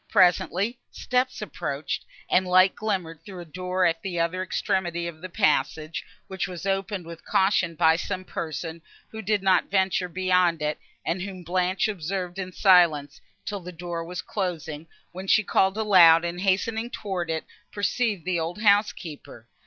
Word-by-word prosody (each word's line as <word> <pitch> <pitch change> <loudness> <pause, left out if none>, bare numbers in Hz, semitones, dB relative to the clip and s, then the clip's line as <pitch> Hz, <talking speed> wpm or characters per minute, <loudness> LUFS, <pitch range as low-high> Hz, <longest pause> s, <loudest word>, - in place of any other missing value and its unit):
Presently 195 +4 +3
steps 255 -3 -1
approached, 140 -7 -4 0.2
and 185 0 +2
light 185 +1 +5
glimmered 180 -7 -3
through 190 -3 -9
a - - -9
door 180 +3 -1
at 165 -1 +1
the 180 -3 -3
other 170 +2 0
extremity 185 -3 -1
of 165 -2 -7
the 185 - -7
passage, 165 -5 0 0.2
which 190 0 -3
was 180 -1 -7
opened 195 -1 -2
with 165 0 -10
caution 190 -3 +2
by 160 0 +4
some 185 +1 -4
person, 160 0 -5 0.3
who 220 - -6
did 210 -1 0
not 185 -2 +3
venture 190 -2 +1
beyond 180 -2 +2
it, 150 0 -1 0.3
and 180 +2 -1
whom 190 -1 -6
Blanche 180 +3 0
observed 185 -1 -4
in 185 -1 -4
silence, 165 -7 +4 0.2
till 205 -1 -3
the 180 0 -8
door 170 -1 -5
was 180 +2 -6
closing, 165 -6 -4 0.2
when 185 +2 -8
she 215 - +4
called 190 +1 +2
aloud, 175 -6 +6
and, 175 +1 -4
hastening 220 +4 0
towards 185 -7 -3
it, 160 -1 -3 0.3
perceived 205 -3 -1
the 180 -2 0
old 170 +6 -4
housekeeper. 180 - 0
180 Hz, 160 wpm, -25 LUFS, 170-195 Hz, 0.3 s, aloud